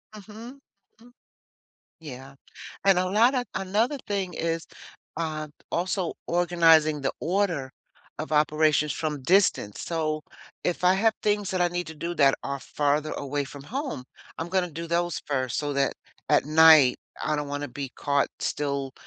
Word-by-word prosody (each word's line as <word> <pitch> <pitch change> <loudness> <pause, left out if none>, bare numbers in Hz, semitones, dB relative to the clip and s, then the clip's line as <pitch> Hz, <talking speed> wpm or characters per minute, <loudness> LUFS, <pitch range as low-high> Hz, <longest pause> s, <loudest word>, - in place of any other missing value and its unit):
Mhm. 220 +6 -11 0.4
Mm. 245 +1 -18 0.9
Yeah, 135 -3 -10 0.5
and 195 -2 +5
a 185 - +1
lotta 240 +7 +3
another 215 +9 0
thing 195 -3 -2
is, 165 0 -2 0.5
uh, 155 -2 -3 0.2
also 180 0 -1
organizing 165 -3 +4
the 135 - 0
order 170 -7 -1 0.5
of 155 +1 -5
operations 150 0 +3
from 150 -3 -3
distance, 170 - +2
so, 155 -2 -2 0.4
if 180 0 -2
I 180 +1 +6
have 220 +3 +3
things 205 -2 0
that 185 -1 0
I 175 - +4
need 175 0 -3
to 160 - -8
do 170 +3 -4
that 140 -4 +4
are 140 0 -3
farther 150 +2 0
away 145 0 -3
from 140 0 -10
home, 260 - -4 0.4
I'm 165 +1 -4
gonna 180 -2 0
do 165 +2 -6
those 170 0 0
first 130 -4 -1
so 145 -1 -2
that 140 0 +1 0.4
at - - +4
night, 155 -4 +7 0.2
I 155 - 0
don't 150 -1 -3
wanna 145 0 -4
be 135 +1 -6
caught 140 -1 +1
still 140 -2 -2
160 Hz, 155 wpm, -26 LUFS, 145-185 Hz, 0.9 s, night